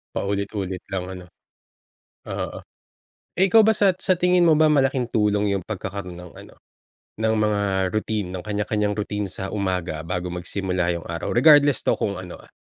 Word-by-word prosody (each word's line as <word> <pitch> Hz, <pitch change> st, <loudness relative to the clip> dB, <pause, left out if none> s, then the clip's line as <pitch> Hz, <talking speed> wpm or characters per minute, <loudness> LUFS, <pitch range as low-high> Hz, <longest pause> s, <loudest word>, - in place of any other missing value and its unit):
Paulit-ulit 100 Hz, -2 st, -3 dB
lang, 95 Hz, -2 st, -2 dB
ano. 90 Hz, -1 st, -8 dB, 1.0 s
Oo. -, -, -4 dB, 0.8 s
Eh, 185 Hz, -, +4 dB
ikaw 225 Hz, -, +7 dB
ba 220 Hz, -, +4 dB
sat 190 Hz, -3 st, +3 dB
sa 185 Hz, -, +2 dB
tingin 180 Hz, 0 st, +3 dB
mo 160 Hz, -, +6 dB
ba 155 Hz, 0 st, +4 dB
malaking 135 Hz, -4 st, +1 dB
tulong 105 Hz, -1 st, +2 dB
'yong 95 Hz, -3 st, -2 dB
pagkakaroon 100 Hz, -3 st, -5 dB
ng 90 Hz, -1 st, -11 dB
ano, -, -, -13 dB, 0.6 s
ng 110 Hz, 0 st, +1 dB
mga 105 Hz, -1 st, +1 dB, 0.3 s
routine, 110 Hz, -3 st, -1 dB
ng 90 Hz, -1 st, -6 dB
kanya-kanyang 105 Hz, 0 st, -1 dB
routine 105 Hz, 0 st, -3 dB
sa 95 Hz, -, -5 dB
umaga 90 Hz, -6 st, -2 dB
bago 90 Hz, +1 st, -3 dB
magsimula 90 Hz, 0 st, -2 dB
'yong 85 Hz, -, -6 dB
araw? 85 Hz, 0 st, -4 dB
Regardless 145 Hz, 0 st, +6 dB
'to -, -, +1 dB
kung 100 Hz, -, -1 dB
ano, 90 Hz, -1 st, -8 dB
ah, -, -, -19 dB
100 Hz, 165 wpm, -23 LUFS, 90-120 Hz, 1.0 s, ikaw